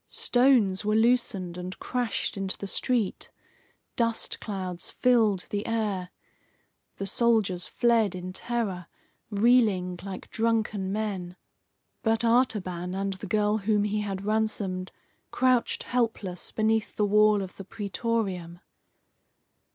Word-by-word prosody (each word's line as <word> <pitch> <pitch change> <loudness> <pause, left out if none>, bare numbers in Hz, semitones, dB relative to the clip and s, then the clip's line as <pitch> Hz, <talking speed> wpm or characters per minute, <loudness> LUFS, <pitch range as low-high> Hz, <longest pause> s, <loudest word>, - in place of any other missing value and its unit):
Stones 245 -7 +3
were 210 +1 +1
loosened 220 -6 +1
and 180 +1 -6
crashed 245 -4 -2
into 195 -1 -3
the - - -6
street. 220 +1 -1 0.7
Dust 230 -1 0
clouds 185 -4 -4
filled 225 -6 +3
the 205 0 -2
air. 210 -5 -1 0.9
The 195 - -4
soldiers 200 -4 +2
fled 230 -5 +2
in 185 0 -6
terror, 200 -6 -2 0.4
reeling 205 -5 +3
like 195 0 -8
drunken 220 -4 0
men. 195 -4 -3 0.7
But 225 0 +1
Artaban 190 -7 +1
and 195 0 -1
the 185 - -7
girl 210 0 +1
whom 210 0 +1
he 210 0 0
had 195 -2 -4
ransomed 205 -4 -1 0.4
crouched 255 -1 +1
helpless 220 -7 -2
beneath 220 0 0
the 210 - +2
wall 210 0 +4
of 185 - -9
the 195 - -7
Praetorium. 195 -4 -3
210 Hz, 120 wpm, -27 LUFS, 190-230 Hz, 0.9 s, wall